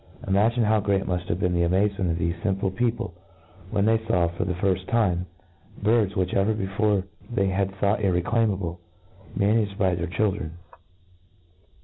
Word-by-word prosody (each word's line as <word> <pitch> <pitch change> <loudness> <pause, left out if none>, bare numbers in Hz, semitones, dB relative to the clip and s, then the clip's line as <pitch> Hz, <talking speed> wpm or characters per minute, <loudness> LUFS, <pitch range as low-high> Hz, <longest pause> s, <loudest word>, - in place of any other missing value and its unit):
Imagine 110 +5 +3
how 110 0 +3
great 100 -1 0
mud 90 -1 -1
have 85 - -1
been 90 -2 +1
the 85 - +1
amazement 95 +2 +1
of 85 - 0
thefe 85 0 -2
fimple 95 -1 -1
people, 120 -5 -1 0.6
when 100 -1 +1
they 110 0 +4
law, 90 -6 +2
for 85 - -3
the 90 - -1
firft 95 0 0
time, 90 -6 +1 0.5
birds, 105 -1 +2
which 95 -2 0
ever 100 +3 +2
before 100 0 0 0.3
they 100 -5 +1
had 95 +1 0
thought 100 +2 +1
irreclaimable^ 95 -2 0 0.6
managed 100 0 +1
by 95 -2 +2
their 85 0 -2
children. 95 -3 -1
95 Hz, 155 wpm, -25 LUFS, 90-105 Hz, 0.6 s, they